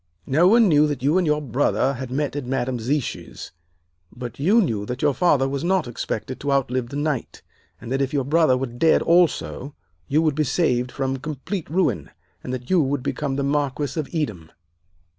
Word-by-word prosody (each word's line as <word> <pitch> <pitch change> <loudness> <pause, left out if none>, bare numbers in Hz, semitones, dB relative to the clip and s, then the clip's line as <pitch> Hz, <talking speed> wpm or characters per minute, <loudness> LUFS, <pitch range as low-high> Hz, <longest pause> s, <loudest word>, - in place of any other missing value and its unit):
No 155 +7 +4
one 225 +2 +6
knew 150 -3 +4
that 145 -4 -4
you 150 +7 +3
and 180 - 0
your 150 0 +1
brother 135 +1 +1
had 130 -1 -6
met 140 +2 -2
at 145 -4 -4
Madame 130 -1 -1
Zichy's. 130 +4 -3 0.6
But 120 +1 -8
you 195 +11 +4
knew 115 - 0
that 125 +2 -4
your 145 - +3
father 145 -5 +3
was 140 +2 -3
not 185 -4 +1
expected 120 +1 -4
to 145 - -2
outlive 130 -3 0
the 140 - -7
night, 145 -3 -3 0.4
and 115 +1 -9
that 135 +1 0
if 135 0 0
your 140 -3 0
brother 150 -3 +3
were 135 - -1
dead 120 +6 +2
also, 165 -5 +1 0.3
you 155 +3 +2
would 155 -2 +2
be 155 +2 +1
saved 125 -4 0
from 135 0 -2
complete 155 +6 -5
ruin, 140 - 0 0.3
and - - -5
that 125 -1 -5
you 180 -3 +5
would 135 -2 -1
become 140 -3 -2
the 140 - -1
Marquis 140 0 -1
of 150 - -3
Edam. 110 - -3
140 Hz, 200 wpm, -23 LUFS, 130-155 Hz, 0.6 s, one